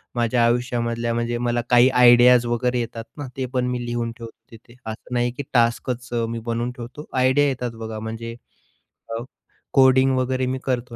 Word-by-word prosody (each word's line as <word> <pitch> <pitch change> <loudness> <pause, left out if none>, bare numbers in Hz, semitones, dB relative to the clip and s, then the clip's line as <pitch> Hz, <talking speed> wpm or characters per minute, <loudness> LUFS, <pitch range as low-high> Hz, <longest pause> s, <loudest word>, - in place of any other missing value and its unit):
माझ्या 120 0 +2
आयुष्यामधल्या 120 -1 -1
म्हणजे 120 0 -1
मला 120 0 0
काही 120 +1 +6
आयडियाज 125 -1 +6
वगैरे 125 +1 0
येतात 115 -1 -5
ना, 145 -2 -5
ते 130 - -1
पण 125 -1 +1
मी 120 -1 -3
लिहून 120 -1 -2
ठेवतो 115 -2 -9 0.2
तिथे 115 +1 -16
असं 110 +3 -7
नाही 120 0 +1
की 125 +4 -6
टास्कच 120 +1 0 0.2
मी 115 0 -4
बनवून 115 +1 -3
ठेवतो. 125 +4 -9
आयडिया 130 +3 +3
येतात 125 -3 -2
बघा 110 -1 -6
म्हणजे 115 +1 -6 0.8
अ, 115 - -5 0.5
कोडिंग 130 0 +5
वगैरे 130 0 0
मी 130 0 -2
करतो 125 -2 -3
120 Hz, 170 wpm, -22 LUFS, 115-125 Hz, 0.8 s, काही